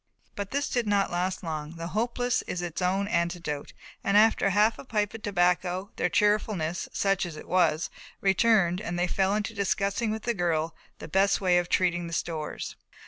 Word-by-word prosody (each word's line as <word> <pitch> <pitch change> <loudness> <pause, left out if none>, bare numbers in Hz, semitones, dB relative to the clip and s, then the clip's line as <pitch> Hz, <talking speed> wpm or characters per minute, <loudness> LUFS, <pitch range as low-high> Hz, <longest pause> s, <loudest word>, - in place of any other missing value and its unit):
But 200 -1 -4
this 285 +4 -1
did 240 -3 -1
not 200 -1 +2
last 180 +2 -1
long, 155 -1 -4
the 165 0 -5
Hopeless 240 +3 0
is 175 - -3
its 175 +1 -4
own 190 +2 +1
antidote 170 -5 -2 0.3
and 200 +1 +3
after 215 -2 +5
half 210 +3 +3
a - - -7
pipe 210 -5 -1
of 225 - -8
tobacco 180 -1 +1
their - - +1
cheerfulness, 205 -5 +1
such 195 -1 +1
as 170 -4 -5
it - - -10
was, 165 -3 +2 0.3
returned 195 -2 +3
and 175 -4 -3
they 175 - +2
fell 195 +3 +1
to 215 +2 -4
discussing 200 +2 0
with 220 0 -3
the 235 - 0
girl 165 -4 0 0.2
the - - -8
best 195 +4 +3
way 180 -2 +3
of 175 0 -3
treating 175 -1 +1
the 165 - -7
stores. 155 -1 -4
190 Hz, 190 wpm, -27 LUFS, 175-210 Hz, 0.3 s, after